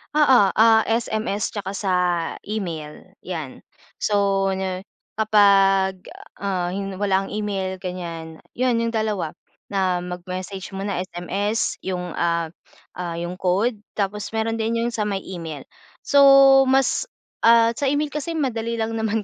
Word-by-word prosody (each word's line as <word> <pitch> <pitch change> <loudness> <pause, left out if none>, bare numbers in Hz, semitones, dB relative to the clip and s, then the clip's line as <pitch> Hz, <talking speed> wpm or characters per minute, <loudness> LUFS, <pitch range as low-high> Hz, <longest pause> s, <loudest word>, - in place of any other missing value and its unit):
Oo, 285 -6 +6
ah, 220 0 +5
SMS 220 -2 -1
tsaka 200 -2 -4
sa 195 -1 -1 0.5
email, 185 -4 -6
'yan. 160 -7 -6 0.3
So 195 -2 +1
'no, 190 -1 -3 0.3
kapag, 195 -3 +4 0.3
ah, 190 -3 -2
hi 190 +3 -3 0.2
walang 195 -1 0
email 195 -3 -3
ganyan, 170 -3 -7
yun 250 -1 +1
yung 230 - -1
dalawa, 215 -7 -1 0.4
na 185 -3 0
mag-message 185 +2 -6
muna 195 +1 -3
SMS 190 +4 -2
yung, 180 -2 -4
ah, 170 -1 0 0.5
ah 175 -2 -3
yung 175 +2 -5
code, 205 +5 +1 0.2
tapos 205 0 -2
meron 225 +1 -1
din 230 +1 0
yung 240 - -1
sa 215 -3 -2
may 195 -2 -2
email. 165 -6 -7 0.4
So 285 - +3 0.5
mas, 270 - +2 0.3
ah, 230 0 +5
sa 275 +4 -2
email 290 +2 0
kasi 300 +3 -4
madali 235 -6 -1
lang 225 0 -2
naman 220 0 -1
200 Hz, 135 wpm, -22 LUFS, 185-225 Hz, 0.5 s, Oo